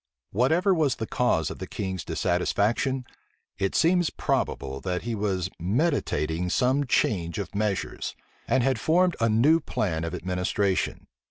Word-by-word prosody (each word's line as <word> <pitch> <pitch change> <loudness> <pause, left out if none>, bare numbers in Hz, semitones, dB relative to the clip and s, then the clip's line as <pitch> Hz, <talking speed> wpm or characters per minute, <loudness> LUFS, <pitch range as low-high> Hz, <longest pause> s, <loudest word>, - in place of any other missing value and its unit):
Whatever 160 - +3
was 150 -7 +2
the 110 - -4
cause 95 -11 +1
of - - -8
the - - -5
king's 95 -3 -4
dissatisfaction, 115 +8 0 0.5
it 95 -1 0
seems 175 0 +3
probable 65 0 -2
that 90 -1 -2
he 120 0 -3
was 100 -4 -1
meditating 90 - 0
some 130 +6 +2
change 85 -8 +1
of 100 - -5
measures, 105 -1 -2 0.3
and 125 +1 +2
had 130 -2 +1
formed 175 +6 +3
a 115 0 +2
new 135 +10 +4
plan 85 - -2
of 85 +2 -3
administration. 90 +2 -1
105 Hz, 145 wpm, -26 LUFS, 90-135 Hz, 0.5 s, new